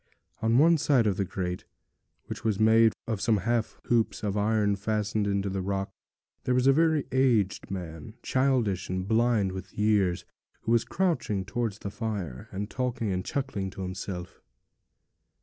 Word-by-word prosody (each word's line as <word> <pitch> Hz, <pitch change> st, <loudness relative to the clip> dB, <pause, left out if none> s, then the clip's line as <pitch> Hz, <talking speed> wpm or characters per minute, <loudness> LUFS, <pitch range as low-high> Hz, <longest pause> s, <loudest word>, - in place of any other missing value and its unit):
On 115 Hz, +1 st, +3 dB
one 165 Hz, +3 st, +5 dB
side 135 Hz, -5 st, +3 dB
of 100 Hz, -3 st, +1 dB
the 100 Hz, -, 0 dB
grate, 90 Hz, -1 st, -4 dB, 0.6 s
which -, -, -7 dB
was 110 Hz, -3 st, 0 dB
made 110 Hz, +1 st, +6 dB
of 110 Hz, -4 st, -3 dB
some 115 Hz, -3 st, +3 dB
half 115 Hz, +3 st, -1 dB
hoops 115 Hz, -2 st, +1 dB
of 100 Hz, -1 st, -1 dB
iron 105 Hz, -1 st, +2 dB
fastened 105 Hz, 0 st, -1 dB
into 100 Hz, 0 st, 0 dB
the 95 Hz, 0 st, -2 dB
rock, 95 Hz, +1 st, -2 dB, 0.5 s
there 125 Hz, -, +1 dB
was 125 Hz, 0 st, +2 dB
a 135 Hz, -, +6 dB
very 160 Hz, -1 st, +3 dB
aged 120 Hz, -7 st, +2 dB
man, 90 Hz, +1 st, -6 dB
childish 125 Hz, -8 st, +1 dB
and 95 Hz, +1 st, -2 dB
blind 110 Hz, -3 st, +2 dB
with 95 Hz, 0 st, -8 dB
years, 105 Hz, -4 st, +2 dB, 0.4 s
who 115 Hz, -, -2 dB
was 115 Hz, -1 st, +3 dB
crouching 160 Hz, -, 0 dB
towards 110 Hz, 0 st, -2 dB
the 100 Hz, -, -6 dB
fire, 100 Hz, -, -4 dB
and 100 Hz, +2 st, -4 dB
talking 125 Hz, -5 st, -2 dB
and 90 Hz, 0 st, -1 dB
chuckling 130 Hz, -9 st, -3 dB
to 95 Hz, 0 st, -7 dB
himself. 90 Hz, -1 st, -6 dB
105 Hz, 165 wpm, -28 LUFS, 95-120 Hz, 0.6 s, made